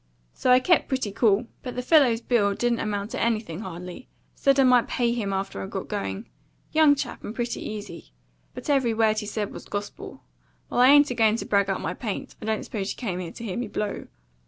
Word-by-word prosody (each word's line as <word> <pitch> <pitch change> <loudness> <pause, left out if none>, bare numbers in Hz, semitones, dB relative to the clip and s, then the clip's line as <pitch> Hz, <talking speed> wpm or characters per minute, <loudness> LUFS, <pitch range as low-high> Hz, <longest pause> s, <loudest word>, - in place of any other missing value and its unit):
So - - -1
I 250 - +7
kept 345 +4 +3
pretty 260 -6 -2
cool; 210 +1 +2 0.2
but 250 - -6
the 250 - -3
fellow's 255 -5 +4
bill 205 -6 +2
didn't 240 +1 0
amount 205 0 -3
to - - -3
anything 215 -7 -1
hardly 180 +3 -8 0.3
said 275 0 +2
I - - +7
might 250 -2 +5
pay 240 -2 0
him 215 -5 -2
after 195 0 -3
I - - -5
got 195 -1 -6
going; 205 +1 -4 0.4
young 310 -2 +5
chap, 275 - -5
and 215 - -6
pretty 240 -1 -3
easy; 205 - -8 0.4
but - - -8
every 265 -6 +2
word 220 -1 +2
he 210 - -6
said 210 -1 -3
was - - -9
gospel. 205 0 -7 0.5
Well, - - 0
I 250 - +7
ain't 290 -1 +6
a - - 0
going 220 -2 +3
to - - -4
brag 200 -1 +2
up 195 - -1
my 180 - -2
paint; 205 +1 -5
I - - -6
don't 220 -1 -1
suppose 200 -3 -4
you - - -7
came 190 -8 -3
here 175 -2 -5
to - - -10
hear 195 -5 -4
me 240 -1 -2
blow." 210 0 -4
220 Hz, 230 wpm, -25 LUFS, 200-245 Hz, 0.5 s, I